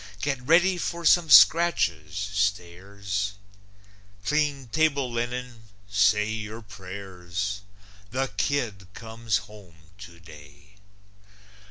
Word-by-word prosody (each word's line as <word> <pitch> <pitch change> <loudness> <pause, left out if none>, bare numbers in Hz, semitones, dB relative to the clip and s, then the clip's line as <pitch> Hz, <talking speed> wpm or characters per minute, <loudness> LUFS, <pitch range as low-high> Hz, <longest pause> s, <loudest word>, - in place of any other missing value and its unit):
Get 135 +1 -2
ready 175 +7 +3
for 170 0 -4
some 170 0 +4
scratches, 100 - +5
stairs! 100 0 -2 0.9
Clean 145 -2 0
table 140 -3 +1
linen, 120 -1 -4 0.2
say 105 +1 +3
your 110 +1 -6
prayers! 95 0 -6 0.5
The 130 +1 -2
kid 105 -6 -2
comes 115 -2 -2
home 85 -7 -17
today! 85 0 -15
105 Hz, 85 wpm, -26 LUFS, 95-130 Hz, 0.9 s, scratches